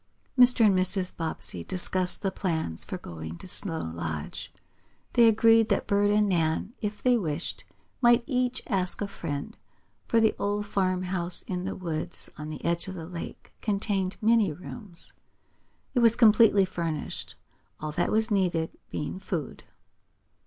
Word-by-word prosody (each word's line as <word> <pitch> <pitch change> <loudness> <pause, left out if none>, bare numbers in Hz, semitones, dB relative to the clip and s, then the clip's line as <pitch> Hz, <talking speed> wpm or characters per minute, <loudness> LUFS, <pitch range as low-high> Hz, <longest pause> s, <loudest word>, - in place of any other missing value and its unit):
Mr. 250 -2 +6
and 205 - +5
Mrs. 185 0 0
Bobbsey 100 - -4
discussed 185 - +2
the 195 - 0
plans 160 - -2
for - - -5
going 80 0 -8
to - - -10
Snow 175 -3 +1
Lodge. 80 -2 -5 0.6
They 235 -1 +6
agreed 225 0 +5
that - - +1
Bert 205 0 +2
and 210 0 +3
Nan, 170 +3 0
if 210 -1 -4
they 250 -2 +4
wished, 160 -3 -4 0.4
might 240 -1 +5
each 255 -1 -1
ask 185 -4 +1
a 205 - -1
friend, 145 -7 -5 0.5
for 230 - +3
the 220 -1 +3
old 205 +1 -1
farmhouse 185 -2 0
in 180 -1 -4
the 195 - -3
woods 165 -4 -2
on 155 0 -7
the 155 - -7
edge 170 +1 0
of 190 - -6
the 165 -3 -7
lake 170 0 -8
contained 200 -2 -1
many 220 -4 +4
rooms. 180 +3 -8 0.8
It 250 - +2
was 230 -1 +5
completely 215 -3 +6
furnished, 165 -4 -4 0.4
all 155 0 -4
that 175 +3 0
was 220 +1 +1
needed 175 -5 +1 0.2
being 150 +5 -4
food. 175 -8 -5
185 Hz, 150 wpm, -27 LUFS, 165-215 Hz, 0.8 s, Mr